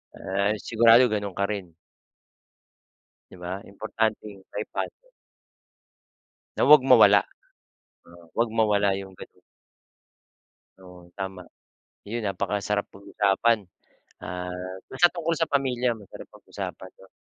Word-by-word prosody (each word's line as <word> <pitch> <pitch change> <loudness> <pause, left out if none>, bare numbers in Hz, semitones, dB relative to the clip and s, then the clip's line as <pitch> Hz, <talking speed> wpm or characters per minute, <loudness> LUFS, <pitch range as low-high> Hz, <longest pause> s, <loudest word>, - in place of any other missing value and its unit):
ah, 100 +3 -1
sigurado 115 +2 +5
gano'n 100 -3 -3
ka 100 - -1
rin. 90 -5 -6 1.6
'Di - - -12
ba? 90 +2 -6
Importanteng 110 -1 -3
maipasa. 110 - -5 1.5
Na - - 0
wag 150 -3 +9
mawala. 105 -5 +8 0.9
Oo, 85 0 -16
wag 115 0 +2
mawala 105 -2 +3
'yong 95 -1 -9
gano'n. - - -13 1.4
Oo, 90 -2 -15
tama. 95 -1 -5 0.6
'Yon, 115 +3 -5
napakasarap 100 +1 -2
pag-usapan, 100 +3 +1 0.7
ah, 90 +1 -5 0.4
basta 155 +7 +4
tungkol 165 -1 -1
sa 165 - +1
pamilya, 125 -3 +1
masarap 105 -4 -12
pag-usapan, 95 - -8
'no. 95 - -17
105 Hz, 105 wpm, -25 LUFS, 95-115 Hz, 1.6 s, wag